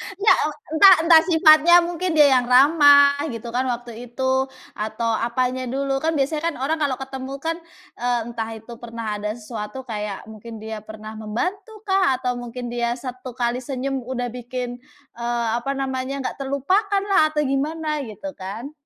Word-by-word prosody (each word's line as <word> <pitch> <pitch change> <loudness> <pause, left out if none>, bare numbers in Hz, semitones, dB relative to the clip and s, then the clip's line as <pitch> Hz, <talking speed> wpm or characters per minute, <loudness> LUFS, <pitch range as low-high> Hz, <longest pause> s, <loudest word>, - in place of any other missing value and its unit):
Engga, 405 +3 +4
e - - +1 0.3
entah 380 +4 +9
entah 330 -1 +7
sifatnya 320 0 +6
mungkin 350 0 -2
dia 300 -2 +7
yang 245 - -4
ramah, 285 +2 +6
gitu 235 -3 -6
kan, 255 +2 -1
waktu 240 -1 -5
itu, 260 +2 0 0.3
atau 220 +2 -2 0.2
apanya 255 +1 -1
dulu. 270 +2 -1
Kan 325 0 +1
biasanya 300 +2 -1
kan - - -11
orang 315 +4 0
kalau 285 -4 0
ketemu 265 0 -7
kan, 325 0 -1 0.4
eee, 245 0 0
entah 225 -1 -4
itu 225 +2 -12
pernah 230 -1 -7
ada 210 +1 -3
sesuatu 230 +2 -7
kayak 210 -4 -5
mungkin 220 +1 -10
dia 220 0 -5
pernah 215 0 -10
membantu 385 - -4
kah, 380 -9 +2
atau 250 -1 -3
mungkin 240 0 -6
dia 240 0 -1
1 255 -1 -8
kali 245 -1 -1
senyum 270 +1 -3
udah 245 0 -3
bikin, 245 0 -6 0.4
eee, 235 0 -1
apa 275 +3 -3
namanya, 270 0 -3
nggak - - -4
terlupakan 375 +10 0
lah 310 -5 +4
atau 300 - +2
gimana 300 +2 -2
gitu 220 +7 -7
kan. 210 +9 -6
260 Hz, 170 wpm, -22 LUFS, 235-295 Hz, 0.4 s, entah